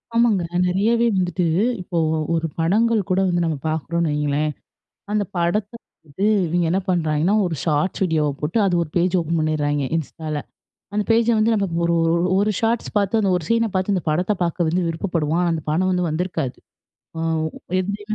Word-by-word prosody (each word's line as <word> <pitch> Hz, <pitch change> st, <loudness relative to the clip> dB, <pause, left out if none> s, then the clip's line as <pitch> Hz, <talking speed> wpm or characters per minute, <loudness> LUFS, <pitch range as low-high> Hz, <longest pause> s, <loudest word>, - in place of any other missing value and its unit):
ஆமாங்க. 230 Hz, -6 st, +3 dB, 0.2 s
நிறையாவே 220 Hz, +6 st, +2 dB
வந்துட்டு 180 Hz, -1 st, 0 dB, 0.4 s
இப்போ 175 Hz, -1 st, -4 dB, 0.4 s
ஒரு 165 Hz, 0 st, 0 dB
படங்கள் 215 Hz, +7 st, +2 dB
கூட 185 Hz, +1 st, +2 dB
வந்து 175 Hz, 0 st, +1 dB
நம்ம 160 Hz, -2 st, -1 dB
பாக்குறோன்னு 160 Hz, +1 st, -1 dB
வைங்களேன். 150 Hz, +1 st, 0 dB, 0.6 s
அந்த 210 Hz, -1 st, +1 dB
படத்த 195 Hz, +5 st, 0 dB, 0.4 s
வந்து 150 Hz, +8 st, -2 dB, 0.2 s
இவிங்க 175 Hz, +1 st, 0 dB
என்ன 190 Hz, -, +2 dB
பண்றாய்ங்கன்னா, 170 Hz, +2 st, +1 dB
ஒரு 170 Hz, -3 st, -2 dB
Shorts 155 Hz, +2 st, 0 dB
வீடியோவா 155 Hz, -4 st, +1 dB
போட்டு, 150 Hz, +8 st, -1 dB
அது 185 Hz, -2 st, +1 dB
ஒரு 160 Hz, -, -11 dB
பேஜ் 180 Hz, +1 st, +2 dB
ஓப்பன் 165 Hz, 0 st, -1 dB
பண்ட்றாய்ங்க, 145 Hz, -2 st, 0 dB
Instaல. 155 Hz, -1 st, -4 dB, 0.5 s
அந்த 210 Hz, -, +1 dB
பேஜ, 230 Hz, 0 st, +4 dB
வந்து 220 Hz, +2 st, +3 dB
நம்ம 200 Hz, -2 st, +1 dB, 0.2 s
ஒரு 170 Hz, 0 st, +2 dB, 0.4 s
ஒரு 205 Hz, +2 st, +2 dB
Shorts 230 Hz, +1 st, 0 dB
பாத்து 205 Hz, +2 st, +2 dB
அந்த 195 Hz, -3 st, +1 dB
ஒரு 175 Hz, -, -4 dB
சீன 230 Hz, -1 st, +2 dB
பாத்து 185 Hz, +2 st, +1 dB
அந்த 185 Hz, -, -1 dB
படத்த 180 Hz, +6 st, +1 dB
பாக்க 170 Hz, 0 st, 0 dB
வந்து 180 Hz, +3 st, +1 dB
விருப்பப்படுவோம். 165 Hz, -1 st, -1 dB
ஆனா, 175 Hz, -, +1 dB
அந்த 155 Hz, -, -4 dB
படம் 185 Hz, +5 st, +1 dB
வந்து 180 Hz, -1 st, 0 dB
வந்திருக்காது. 160 Hz, -5 st, -2 dB, 0.6 s
வோ -, -, -3 dB, 0.6 s
எதுலயுமே 205 Hz, +3 st, -4 dB
175 Hz, 170 wpm, -21 LUFS, 160-200 Hz, 0.6 s, பேஜ